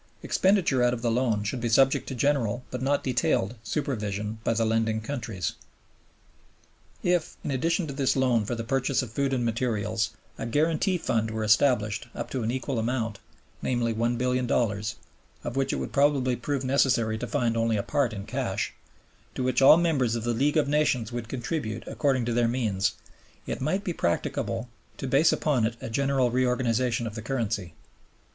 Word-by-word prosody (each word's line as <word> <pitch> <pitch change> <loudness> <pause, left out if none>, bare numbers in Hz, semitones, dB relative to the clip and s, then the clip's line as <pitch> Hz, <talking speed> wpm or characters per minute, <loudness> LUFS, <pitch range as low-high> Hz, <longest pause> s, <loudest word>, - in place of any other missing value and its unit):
Expenditure 185 -9 +2
out 125 0 +3
of 115 - -9
the 120 - +2
loan 115 -3 +1
should 120 +4 -3
be 120 - 0
subject 135 +4 +3
to 135 - -4
general, 125 -3 +1
but 125 - -4
not 140 +2 +1
detailed, 120 -4 +1
supervision 105 -4 -3
by - - +1
the 115 0 +2
lending 110 0 +1
countries. 115 - -4 1.5
If, 175 -2 0
in - - -2
addition 165 +6 +1
to 140 - -5
this 135 -1 +1
loan 125 -4 +2
for 120 - -2
the 115 - -4
purchase 130 +2 0
of 120 - -8
food 140 +3 0
and 125 -3 0
materials, 110 -2 0 0.3
a 115 - -3
guarantee 160 - +1
fund 110 -8 0
were 110 0 -3
established 110 -1 +2
up - - -5
to 130 - -2
an 110 - -1
equal 130 0 -2
amount, 115 -2 -2 0.4
namely 120 -2 0
$1,000,000,000 120 -2 0 0.5
(of 120 - -4
which 135 0 +1
it - - -1
would - - -4
probably 140 -3 +3
prove 135 +3 -2
necessary 125 -5 +2
to 125 - -4
find 115 +2 0
only 115 -1 +1
a 100 - -1
part 140 -5 +1
in 100 -2 -6
cash), - - -2 0.6
to 130 - -2
which 130 0 +1
all 135 +4 +9
members 140 -9 +1
of 115 - -3
the 120 0 0
League 140 +6 +1
of 150 -2 +3
Nations 140 -6 +1
would 120 -1 -5
contribute 120 -3 -3
according 135 -5 0
to 120 - -1
their 120 0 +3
means, 105 -6 0 0.5
it - - -4
might 185 +9 0
be 180 - -2
practicable 110 - -1 0.3
to - - -5
base 140 +5 +4
upon 140 -7 +1
it 115 +1 0
a - - -6
general 135 0 +1
reorganization 125 -1 +1
of 110 - -4
the 110 - -6
currency. 110 -8 -2
120 Hz, 180 wpm, -27 LUFS, 115-135 Hz, 1.5 s, all